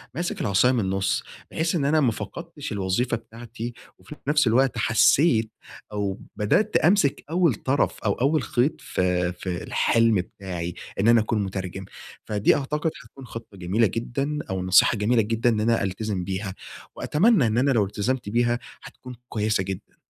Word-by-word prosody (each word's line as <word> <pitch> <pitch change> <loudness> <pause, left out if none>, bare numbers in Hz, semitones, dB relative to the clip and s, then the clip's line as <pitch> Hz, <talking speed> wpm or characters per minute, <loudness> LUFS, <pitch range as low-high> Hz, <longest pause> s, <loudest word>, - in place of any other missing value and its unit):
ماسك 175 +2 -3
العصاية 105 +5 +3
من 125 - +1
النص، 95 -1 0 0.3
بحيث 165 +2 -1
إن 145 -5 0
أنا 155 +2 +3
ما 125 -5 +3
فقدتش - - -7
الوظيفة 100 +5 0
بتاعتي، 115 +1 -8 0.3
وفي 150 - -11
نفس 150 -2 +3
الوقت 130 +3 +2
حسّيت 115 0 +3 0.4
أو 100 -2 -2 0.2
بدأت 195 - +1
أمسك 170 -5 +2
أوّل 170 -3 +3
طرف 135 +6 0
أو 100 - +3
أوّل 145 +5 +1
خيط 125 +5 0
في 90 -1 0
في 90 -1 -5
الحلم 115 -1 +2
بتاعي، 90 -2 -4 0.2
إن 105 - +2
أنا 115 -1 +6
أكون 110 -1 -1
مترجم. 95 0 -5 0.4
فدي 105 -1 +2
أعتقد 150 +3 -1
حتكون 135 -1 -13
خطّة 115 -4 -10
جميلة 95 +5 +1
جدًا 135 +8 -3
أو 95 -1 -2
نصيحة 95 +5 +5
جميلة 115 +3 +2
جدًا 115 +3 +1
إن 110 - +1
أنا 115 0 +2
ألتزم 100 0 -3
بيها، 95 +1 -4 0.4
وأتمنى 170 - +3
إن 110 +1 0
أنا 135 +3 +3
لو 110 -6 +3
التزمت 105 +4 -2
بيها 120 +2 +1 0.2
هتكون 125 -1 -11
كويّسة 105 -2 0
جدًا. 95 -1 -7
115 Hz, 160 wpm, -24 LUFS, 100-135 Hz, 0.4 s, أنا